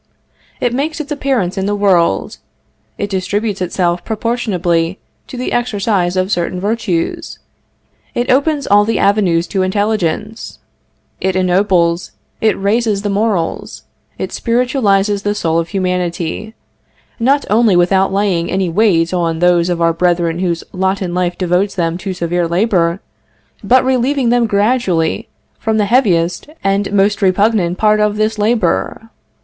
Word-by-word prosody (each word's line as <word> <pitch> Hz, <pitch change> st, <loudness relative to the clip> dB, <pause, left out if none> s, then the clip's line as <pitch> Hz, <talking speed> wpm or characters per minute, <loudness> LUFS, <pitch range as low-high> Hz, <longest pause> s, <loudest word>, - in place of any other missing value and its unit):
It 245 Hz, -1 st, 0 dB
makes 300 Hz, +5 st, -2 dB
its 305 Hz, 0 st, -6 dB
appearance 255 Hz, -10 st, -1 dB
in 190 Hz, -, -1 dB
the 205 Hz, -, 0 dB
world; 180 Hz, -, +1 dB, 0.6 s
it -, -, -2 dB
distributes 200 Hz, +1 st, -2 dB
itself 175 Hz, -1 st, -1 dB
proportionably 195 Hz, -7 st, -1 dB, 0.3 s
to 255 Hz, -, -8 dB
the 250 Hz, -, -3 dB
exercise 205 Hz, -6 st, 0 dB
of 185 Hz, +2 st, 0 dB
certain 175 Hz, 0 st, -1 dB
virtues; 200 Hz, -4 st, -2 dB, 0.8 s
it 240 Hz, +1 st, 0 dB
opens 285 Hz, +2 st, +1 dB
all 205 Hz, +1 st, +4 dB
the 225 Hz, +2 st, -1 dB
avenues 190 Hz, -5 st, +2 dB
to 195 Hz, -, -1 dB
intelligence; 210 Hz, +1 st, -2 dB, 0.6 s
it 190 Hz, 0 st, -1 dB
ennobles, 180 Hz, -2 st, +1 dB, 0.3 s
it 220 Hz, -, +2 dB
raises 205 Hz, 0 st, 0 dB
the 205 Hz, -, -1 dB
morals; 200 Hz, -5 st, -2 dB, 0.3 s
it -, -, -4 dB
spiritualizes 220 Hz, -5 st, +1 dB
the 205 Hz, +1 st, -1 dB
soul 165 Hz, -5 st, 0 dB
of 165 Hz, 0 st, -3 dB
humanity, 180 Hz, +2 st, -3 dB, 0.6 s
not 275 Hz, +5 st, +2 dB
only 215 Hz, -2 st, +3 dB
without 190 Hz, +2 st, +3 dB
laying 190 Hz, -4 st, 0 dB
any 190 Hz, -1 st, 0 dB
weight 170 Hz, -3 st, +2 dB
on 170 Hz, -2 st, 0 dB
those 175 Hz, 0 st, +2 dB
of 175 Hz, -1 st, -1 dB
our 165 Hz, 0 st, +3 dB
brethren 170 Hz, -1 st, 0 dB
whose 175 Hz, -3 st, -1 dB
lot 190 Hz, +1 st, -1 dB
in 175 Hz, -2 st, -4 dB
life 180 Hz, -1 st, -1 dB
devotes 185 Hz, +2 st, 0 dB
them 165 Hz, -2 st, -1 dB
to 190 Hz, +1 st, -4 dB
severe 175 Hz, -1 st, -1 dB
labor, 175 Hz, -1 st, +1 dB, 0.6 s
but 255 Hz, +1 st, +3 dB
relieving 260 Hz, 0 st, +1 dB
them 240 Hz, -1 st, +2 dB
gradually 200 Hz, -6 st, 0 dB, 0.3 s
from 220 Hz, 0 st, 0 dB
the 210 Hz, -, +2 dB
heaviest 185 Hz, -, +1 dB
and 195 Hz, +1 st, 0 dB
most 205 Hz, +1 st, +2 dB
repugnant 190 Hz, -2 st, +2 dB
part 215 Hz, 0 st, +3 dB
of 210 Hz, 0 st, +1 dB
this 215 Hz, 0 st, 0 dB
labor. 225 Hz, +1 st, 0 dB
195 Hz, 145 wpm, -15 LUFS, 175-220 Hz, 0.8 s, all